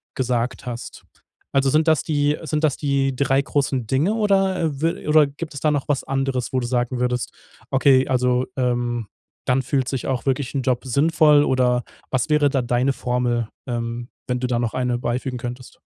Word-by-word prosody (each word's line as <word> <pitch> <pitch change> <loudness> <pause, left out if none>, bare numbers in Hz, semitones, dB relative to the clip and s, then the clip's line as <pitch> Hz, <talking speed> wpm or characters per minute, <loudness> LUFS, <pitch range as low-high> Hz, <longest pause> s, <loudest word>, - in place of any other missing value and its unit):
gesagt 125 0 -1
hast. 120 -1 -7 0.5
Also 135 0 +3
sind 155 +4 +2
das 155 -5 +3
die 145 -1 +1
sind 155 0 -2
das 150 -4 +2
die 140 -2 0
3 135 +1 +2
großen 135 -3 -1
Dinge 145 - +1
oder, 195 -3 +2
äh, 150 -3 -2
wil 165 -1 -1
oder 150 -1 +5
gibt 155 +3 -7
es 140 - -6
da 155 - +2
noch 145 -2 -1
was 145 -2 0
anderes, 135 -2 -2
wo 130 - +2
du 125 - -3
sagen 125 0 -1
würdest, 125 0 -1 0.4
okay, 135 0 +4
also, 125 0 +1
ähm, 120 -2 0 0.4
dann 130 +1 +2
fühlt 130 -1 0
sich 135 -3 -3
auch 130 -3 -2
wirklich 135 -1 -1
'n 135 - 0
Job 125 0 -1
sinnvoll 150 +2 +4
oder 125 -2 +2 0.3
was 130 +1 0
wäre 150 -2 +4
da 135 -1 0
deine 125 +3 +1
Formel, 125 -2 -1 0.2
ähm, 120 0 -4 0.2
wenn 125 0 -1
du 125 - -1
da 120 -1 0
noch 120 -2 -1
eine 125 -1 0
beifügen 125 +1 -2
könntest? 125 +1 -8
130 Hz, 190 wpm, -22 LUFS, 125-145 Hz, 0.5 s, oder